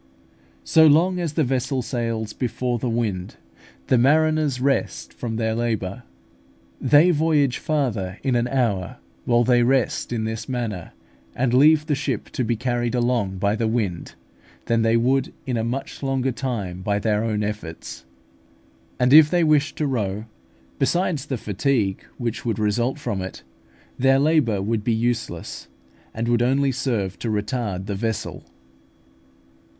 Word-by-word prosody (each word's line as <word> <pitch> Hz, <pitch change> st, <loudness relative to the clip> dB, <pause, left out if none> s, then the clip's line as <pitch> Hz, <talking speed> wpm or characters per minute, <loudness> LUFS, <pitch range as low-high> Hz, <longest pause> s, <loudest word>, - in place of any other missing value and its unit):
So 160 Hz, -, +5 dB
long 175 Hz, +5 st, +4 dB
as 165 Hz, -4 st, -2 dB
the 155 Hz, -, +1 dB
vessel 130 Hz, 0 st, -1 dB
sails 115 Hz, -3 st, -3 dB
before 125 Hz, 0 st, -2 dB
the 125 Hz, -, -2 dB
wind, 110 Hz, -6 st, -2 dB, 0.5 s
the 130 Hz, -, +3 dB
mariners 155 Hz, 0 st, +3 dB
rest 135 Hz, +1 st, -1 dB
from 115 Hz, -2 st, -5 dB
their 110 Hz, 0 st, 0 dB
labour. 110 Hz, -3 st, -2 dB, 0.8 s
They 155 Hz, +5 st, +5 dB
voyage 150 Hz, -5 st, +2 dB
farther 115 Hz, -11 st, -1 dB
in 130 Hz, -3 st, +1 dB
an 120 Hz, 0 st, +1 dB
hour, 115 Hz, -9 st, -1 dB, 0.3 s
while 120 Hz, 0 st, +3 dB
they 120 Hz, 0 st, +4 dB
rest 130 Hz, 0 st, +1 dB
in 115 Hz, -2 st, -1 dB
this 110 Hz, +3 st, -4 dB
manner 115 Hz, -8 st, -4 dB, 0.4 s
and 125 Hz, -1 st, 0 dB
leave 150 Hz, +4 st, +5 dB
the 155 Hz, -, 0 dB
ship 140 Hz, -5 st, -3 dB
to 130 Hz, -, -2 dB
be 120 Hz, 0 st, 0 dB
carried 120 Hz, +1 st, -1 dB
along 120 Hz, -6 st, 0 dB
by 100 Hz, +2 st, +1 dB
the 115 Hz, 0 st, 0 dB
wind, 105 Hz, -7 st, -2 dB, 0.5 s
than 115 Hz, -1 st, +1 dB
they 115 Hz, +1 st, +3 dB
would 130 Hz, +3 st, +1 dB
in 130 Hz, -3 st, -2 dB
a 115 Hz, -, 0 dB
much 125 Hz, +4 st, -4 dB
longer 135 Hz, -1 st, 0 dB
time 110 Hz, -8 st, -4 dB
by 100 Hz, +1 st, 0 dB
their 105 Hz, 0 st, 0 dB
own 105 Hz, -2 st, -1 dB
efforts; 105 Hz, -10 st, -6 dB, 1.0 s
and 125 Hz, +2 st, +3 dB
if 155 Hz, 0 st, +9 dB
they 175 Hz, 0 st, +2 dB
wished 155 Hz, -1 st, +2 dB
to 155 Hz, -, -1 dB
row, 105 Hz, -6 st, -2 dB, 0.5 s
besides 155 Hz, 0 st, 0 dB
the 130 Hz, -, -2 dB
fatigue 105 Hz, -1 st, -1 dB
which 120 Hz, -2 st, -3 dB
would 115 Hz, -4 st, -1 dB
result 115 Hz, +5 st, 0 dB
from 105 Hz, -9 st, -3 dB
it, 95 Hz, -, -7 dB, 0.6 s
their 135 Hz, +1 st, +4 dB
labour 135 Hz, -9 st, +2 dB
would 110 Hz, 0 st, -1 dB
be 115 Hz, -, +1 dB
useless, 115 Hz, -7 st, -3 dB, 0.4 s
and 115 Hz, +1 st, -3 dB
would 120 Hz, 0 st, +2 dB
only 135 Hz, +3 st, +2 dB
serve 105 Hz, -8 st, -2 dB
to 115 Hz, -, -3 dB
retard 105 Hz, -3 st, -2 dB
the 100 Hz, -, -3 dB
vessel. 110 Hz, +2 st, -3 dB
120 Hz, 155 wpm, -23 LUFS, 110-135 Hz, 1.0 s, if